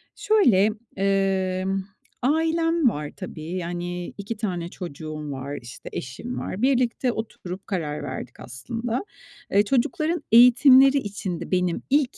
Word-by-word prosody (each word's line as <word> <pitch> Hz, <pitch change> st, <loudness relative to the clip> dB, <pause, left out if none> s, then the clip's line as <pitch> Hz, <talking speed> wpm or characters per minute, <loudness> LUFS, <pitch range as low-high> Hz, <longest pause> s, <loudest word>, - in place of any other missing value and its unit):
Şöyle 245 Hz, -, +4 dB, 0.3 s
emm, 195 Hz, -1 st, 0 dB, 0.4 s
ailem 325 Hz, +2 st, +2 dB
var 150 Hz, -7 st, -5 dB
tabii. 165 Hz, -4 st, -7 dB
Yani, 175 Hz, 0 st, -4 dB
2 205 Hz, +3 st, -5 dB
tane 180 Hz, -6 st, -3 dB
çocuğum 155 Hz, -3 st, -6 dB
var. 140 Hz, +1 st, -5 dB
İşte, 120 Hz, +1 st, -10 dB
eşim 135 Hz, -, -5 dB
var. 195 Hz, -, -5 dB
Birlikte 255 Hz, -1 st, +2 dB
oturup 195 Hz, -4 st, -6 dB
karar 150 Hz, -6 st, -3 dB
verdik 130 Hz, -3 st, -6 dB
aslında. 230 Hz, -, -4 dB, 0.5 s
Eee, 200 Hz, -, +5 dB
çocukların 300 Hz, +8 st, 0 dB
eğitimleri 260 Hz, +3 st, +7 dB
içindi 195 Hz, -8 st, -4 dB
benim 180 Hz, -2 st, +1 dB
ilk 280 Hz, -2 st, +2 dB
195 Hz, 120 wpm, -24 LUFS, 175-250 Hz, 0.5 s, eğitimleri